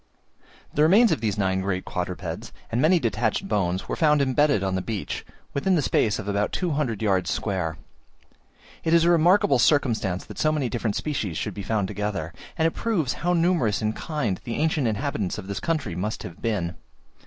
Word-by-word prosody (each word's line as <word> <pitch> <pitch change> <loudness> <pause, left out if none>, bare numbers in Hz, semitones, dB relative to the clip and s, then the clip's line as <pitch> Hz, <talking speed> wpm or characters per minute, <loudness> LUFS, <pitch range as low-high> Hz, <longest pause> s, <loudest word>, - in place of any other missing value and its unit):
The 150 - +1
remains 200 +9 +6
of - - 0
these 105 -3 -1
nine 95 -1 +1
great 95 -1 -2
quadrupeds, 90 -2 -4 0.2
and 120 - +1
many 175 +5 +5
detached 115 -5 0
bones, 95 -3 0
were - - -2
found 150 -2 +3
embedded 140 -4 +2
on 95 -1 0
the 95 - 0
beach, 105 0 -4 0.3
within 185 +7 +2
the 160 - +2
space 105 -4 +2
of 105 - -6
about 100 0 0
200 145 - -1
yards 95 -4 +1
square. 90 -6 -2 1.1
It 165 +1 +3
is 165 - +5
a 170 - +4
remarkable 170 -4 +4
circumstance 115 - +2
that - - -9
so 155 - +3
many 145 -5 0
different 115 -4 -2
species 110 - -2
should - - -3
be 105 - -6
found 100 -1 0
together; 100 -5 -3 0.2
and 160 - +2
it - - 0
proves 170 - -1
how 175 +1 +2
numerous 165 - +2
in 110 0 0
kind 140 - -2
the 115 - -4
ancient 155 -4 +1
inhabitants 110 -3 -2
of 105 - -6
this 100 0 -4
country 155 - -2
must 105 +5 -3
have 85 - -9
been. 100 -7 -1
110 Hz, 190 wpm, -25 LUFS, 95-155 Hz, 1.1 s, remains